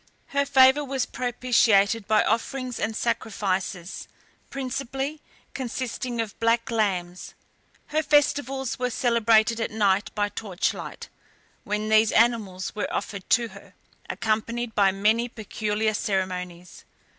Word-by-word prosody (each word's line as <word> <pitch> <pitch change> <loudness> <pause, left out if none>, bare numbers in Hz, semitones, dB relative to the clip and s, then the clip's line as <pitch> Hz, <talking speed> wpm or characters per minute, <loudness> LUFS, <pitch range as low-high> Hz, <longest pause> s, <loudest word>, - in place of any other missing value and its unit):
Her 280 0 0
favour 265 +3 +6
was 270 -2 -1
propitiated 230 -4 +2
by 215 0 +4
offerings 250 +2 -2
and 220 +1 -2
sacrifices, 195 -6 -2 0.4
principally 270 +2 -4 0.3
consisting 250 -1 -4
of 225 -3 -4
black 230 0 +1
lambs. 185 -5 -2 0.5
Her 310 +1 +1
festivals 280 -4 +1
were 250 0 0
celebrated 230 -1 +3
at - - -1
night, 205 -2 +1
by 205 -1 0
torchlight, 200 -4 -4 0.6
when 210 +1 -2
these 220 0 +5
animals 215 -6 +1
were 210 - -3
offered 200 -3 -4
to 235 -1 +3
her, - - -15 0.3
accompanied 225 +2 -2
by 200 -2 +4
many 215 +5 +1
peculiar 215 -1 -2
ceremonies. 180 -4 -3
225 Hz, 115 wpm, -25 LUFS, 205-250 Hz, 0.6 s, favour